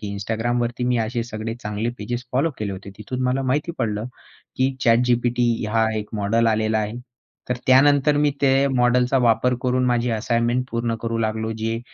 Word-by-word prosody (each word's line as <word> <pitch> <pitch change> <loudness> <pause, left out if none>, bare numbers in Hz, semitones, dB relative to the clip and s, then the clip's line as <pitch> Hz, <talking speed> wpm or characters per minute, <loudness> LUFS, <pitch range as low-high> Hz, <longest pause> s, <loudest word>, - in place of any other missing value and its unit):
की 105 - -5
Instagramवरती 120 +4 -2
मी 125 -1 +2
असे 115 +1 -1
सगळे 115 -1 -5
चांगले 105 +2 -2
पेजेस 120 +4 -4
फॉलो 140 +6 +2
केले 100 -2 -3
होते. 95 +1 -8
तिथून 130 +4 -4
मला 130 +2 0
माहिती 145 +6 -1
पडलं 110 -3 -1 0.5
की 130 +1 +1
ChatGPT 120 -1 +2
हा 110 0 +3
एक 105 -1 -4
मॉडेल 115 +3 +2
आलेला 110 0 +1
आहे. 105 0 -2 0.6
तर 125 - +1
त्यानंतर 145 +2 +5
मी 145 0 +3
ते 135 0 +4
मॉडेलचा 125 +1 +3
वापर 125 +3 +2
करून 125 0 +1
माझी 120 0 +1
असाइनमेंट 120 +2 0
पूर्ण 115 0 -1
करू 115 0 -2
लागलो. 110 0 -1
जे 110 +1 -3
120 Hz, 170 wpm, -22 LUFS, 110-125 Hz, 0.6 s, त्यानंतर